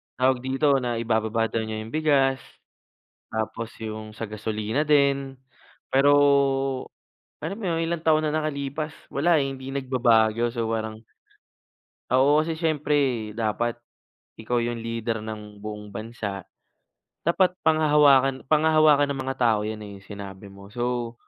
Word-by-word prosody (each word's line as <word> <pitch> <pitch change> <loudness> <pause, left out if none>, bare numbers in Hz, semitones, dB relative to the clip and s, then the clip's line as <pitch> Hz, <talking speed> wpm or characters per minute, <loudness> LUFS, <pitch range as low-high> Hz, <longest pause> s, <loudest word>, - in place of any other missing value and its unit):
tawag 130 0 +2
dito, 135 +3 +1
na 120 -2 -2
ibababa 115 -1 0
daw 115 - 0
niya 110 0 -4
yung 110 - -10
bigas. 140 -4 +2 0.9
Tapos 110 +1 -4
yung 110 -1 -6
sa - - -9
gasolina 110 +6 -2
din, 140 -2 +2 0.6
pero, 135 +2 +4 1.3
alam - - -3
mo 225 - -6
yun, 165 0 0
ilang 170 0 -2
taon 155 -1 +3
na 150 - -1
nakalipas, 150 -1 -2 0.2
wala 160 +4 +3
eh, 140 - +1
hindi 135 -1 -6
nagbabago. 120 -4 +2
So, 115 -1 -3
parang 110 0 -4 1.1
Oo, 140 +4 +4
kasi 160 0 -3
siyempre 150 -2 +1 0.4
dapat 115 +2 -1 0.6
ikaw 115 +2 -2
yung 120 -1 -3
leader 115 -1 -3
ng 105 -1 -8
buong 105 -1 -7
bansa. 110 -3 -5 0.8
Dapat 180 +2 +2
panghahawakan 145 -4 +4
panghahawakan 155 -2 +5
ng 135 -1 -3
mga 135 0 -3
tao 115 -4 +3
yan 110 0 -4
eh, 100 - -9
yung - - -19
sinabi 100 -1 -9
mo. 100 0 -13
So, 120 -1 -2
125 Hz, 140 wpm, -25 LUFS, 110-145 Hz, 1.3 s, panghahawakan